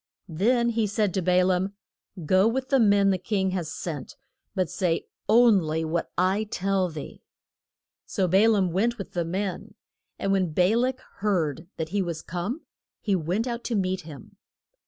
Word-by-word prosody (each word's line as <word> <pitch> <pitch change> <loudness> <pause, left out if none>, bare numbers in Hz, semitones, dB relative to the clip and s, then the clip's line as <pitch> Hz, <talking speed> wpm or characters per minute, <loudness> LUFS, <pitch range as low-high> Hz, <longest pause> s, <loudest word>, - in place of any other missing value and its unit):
Then 235 +7 +2
he 225 -2 +1
said 205 -2 0
to 190 - 0
Ba 180 +1 +3
laam, 190 +2 0 0.5
Go 185 +5 +4
with 260 +3 -1
the 270 - +4
men 200 -3 +4
the 185 - 0
king 190 0 0
has 175 -4 -3
sent, 160 -3 -6 0.4
but 185 -2 +1
say 165 +1 -1 0.2
on 225 -1 +6
ly 160 -1 -2
what 165 +1 -2
I 185 +3 +2
shall 215 - -3
tell 195 -1 0
thee. 155 -3 -8 0.9
So 190 - 0
Ba 195 +5 +5
laam 195 -5 +2
went 230 +7 +1
with 200 - -7
the 175 - -1
men, 185 +2 -4 0.4
and 195 - -1
when 185 -5 +1
Ba 180 +6 +3
lak 255 +2 0 0.2
heard 165 -6 -1
that 160 -1 -3
he 200 +3 0
was 170 -4 -4
come 185 - -4 0.4
he 200 -3 0
went 180 +6 -1
out 240 -1 -4
to 235 - -1
meet 185 -2 0
him. 160 +4 -12
190 Hz, 180 wpm, -26 LUFS, 175-215 Hz, 0.9 s, on